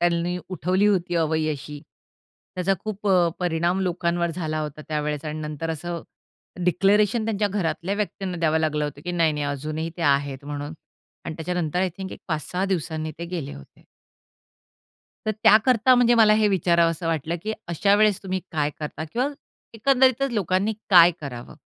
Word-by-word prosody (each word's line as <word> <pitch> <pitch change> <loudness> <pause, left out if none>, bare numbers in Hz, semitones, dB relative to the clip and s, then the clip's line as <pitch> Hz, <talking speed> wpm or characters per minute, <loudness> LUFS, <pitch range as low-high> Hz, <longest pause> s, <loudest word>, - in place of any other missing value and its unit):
त्यांनी 175 +1 +1
उठवली 185 +3 +1
होती 180 -3 +1
अवई 160 -1 +1
अशी, 145 +1 -8 0.7
त्याचा 185 +1 +1
खूप 210 -1 -3 0.3
परिणाम 175 +2 0
लोकांवर 170 -1 0
झाला 155 -2 -3
होता 150 0 -6
त्यावेळेस 150 -1 -2
आणि 155 0 -4
नंतर 155 +2 -4
असं 170 +2 -4 0.6
डिक्लेरेशन 205 +5 +3
त्यांच्या 210 -2 0
घरातल्या 190 0 -2
व्यक्तींना 195 -2 -3
द्यावं 160 -1 +2
लागलं 150 -1 0
होतं 145 -1 -6
की 175 - -3
नाही-नाही 155 -4 +1
अजूनही 155 +3 -3
ते 170 - -4
आहेत 140 -2 +1
म्हणून 145 +2 -5 0.5
आणि 160 - -5
त्याच्यानंतर 175 0 -2
आय 190 - +2
थिंक 190 0 -5
एक - - -10
5-6 175 +4 -2
दिवसांनी 160 -4 -2
ते 170 - -4
गेले 170 -5 -5
होते. 70 - -15 1.4
तर 215 - +2
त्याकरता, 240 +3 +5
म्हणजे 240 -1 +4
मला 220 -2 +6
हे 215 -1 +3
विचारावंस 170 -3 +2
वाटलं 165 0 -1
की 220 - -2 0.2
अशा 200 +4 +3
वेळेस 210 -2 +3
तुम्ही 190 -1 -2
काय 150 -2 0
करता? 155 +1 -5
किंवा 255 +4 +1 0.5
एकंदरीतच 265 +2 +3
लोकांनी 200 0 +1 0.2
काय 175 -1 +9
करावं? 125 -5 -8
170 Hz, 155 wpm, -24 LUFS, 155-195 Hz, 1.4 s, काय